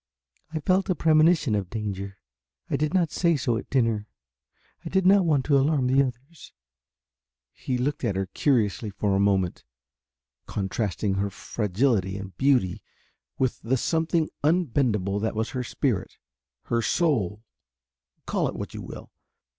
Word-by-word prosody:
I 160 - -2
felt 185 +6 +1
a 185 - +2
premonition 155 -4 +4
of 100 -3 -1
danger. 100 -2 -5 0.5
I - - +2
did 155 0 0
not 175 -4 +1
say 170 -2 +2
so 125 -3 0
at - - -5
dinner. 115 -5 +1 0.8
I - - -5
did 190 0 +1
not 195 0 +6
want 145 -5 +2
to 140 -2 +4
alarm 140 -1 +2
the 130 +2 +4
others." 135 +5 -6 1.0
He 125 - -3
looked 135 +4 -2
at 105 -6 0
her 95 0 0
curiously 110 -1 0
for 100 0 -1
a - - +2
moment, 95 -3 +1 0.8
contrasting 100 0 -2
her 100 +1 0
fragility 100 -1 -1
and 95 -2 -8
beauty 110 -6 +2 0.6
with 130 -2 -1
the 130 +3 0
something 160 +3 0
unbendable 125 - +1
that 110 0 -1
was 110 +1 -2
her 125 -1 -3
spirit, 120 -4 -2 0.5
her 115 0 0
soul 110 - 0 0.8
call - - 0
it - - -5
what - - -6
you - - -6
will. - - -10
125 Hz, 150 wpm, -26 LUFS, 100-150 Hz, 1.0 s, not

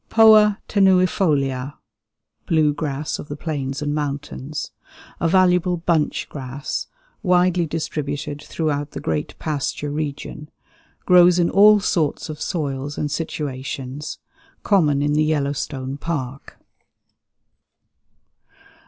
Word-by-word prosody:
Poa 215 -2 +6
tenuifolia 165 -9 +2 0.7
(blue 155 -3 +3
grass 145 0 -3
of - - -8
the 145 - -5
plains 145 -2 -4
and 145 0 -1
mountains). 145 0 -4 0.5
A 170 - +1
valuable 180 0 +3
"bunch 165 -2 0
grass," 135 0 -5 0.3
widely 180 -3 +2
distributed 145 -2 -4
throughout 145 -2 -3
the - - -5
great 80 -2 -3
pasture 145 -1 -3
region; 150 0 -5 0.6
grows 180 -1 +6
in 170 -1 +2
all 210 +1 +7
sorts 160 -5 -1
of 155 0 -7
soils 145 -4 -3
and 150 -1 -2
situations; 140 -2 -4 0.5
common 150 -8 +3
in 145 0 +1
the 155 +1 +3
Yellowstone 140 -3 -2
Park. 135 -5 -5
150 Hz, 105 wpm, -21 LUFS, 140-175 Hz, 0.7 s, all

